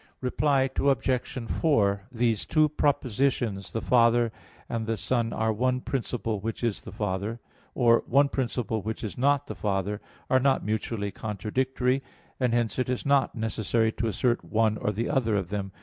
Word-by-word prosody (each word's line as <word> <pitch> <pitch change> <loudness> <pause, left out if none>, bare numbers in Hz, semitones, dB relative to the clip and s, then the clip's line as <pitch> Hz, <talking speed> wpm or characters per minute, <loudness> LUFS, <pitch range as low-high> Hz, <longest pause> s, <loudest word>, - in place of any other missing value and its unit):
Reply 135 +1 +2
Obj. 130 -3 0
4: 100 -11 +3
These 115 -3 0
two 155 -1 +3
propositions, 125 -7 0
"The 115 - -3
Father 120 -1 +4 0.4
and 115 -1 -3
the 115 0 0
Son 115 +1 0
are 110 0 0
one 125 +3 +1
principle 120 -5 -2
which 115 +4 -4
is 115 -4 0
the - - -9
Father," 105 +3 -3 0.4
or, 115 -2 +4
"one 140 +3 +4
principle 120 -5 -2
which 110 +4 -4
is 105 - -4
not 140 +2 +2
the - - -6
Father," 100 0 -2 0.3
are 130 - +4
not 135 0 +2
mutually 105 -1 -2
contradictory; 125 +6 -1 0.4
and 125 -3 +2
hence 120 0 0
it 125 - 0
is 125 - -2
not 140 -2 +2
necessary 110 0 0
to 115 +1 -2
assert 120 +3 0
one 110 -1 +1
or 105 - -1 0.2
other 130 -7 +1
of 95 -4 -1
them. 100 -1 -3
115 Hz, 165 wpm, -27 LUFS, 110-130 Hz, 0.4 s, Father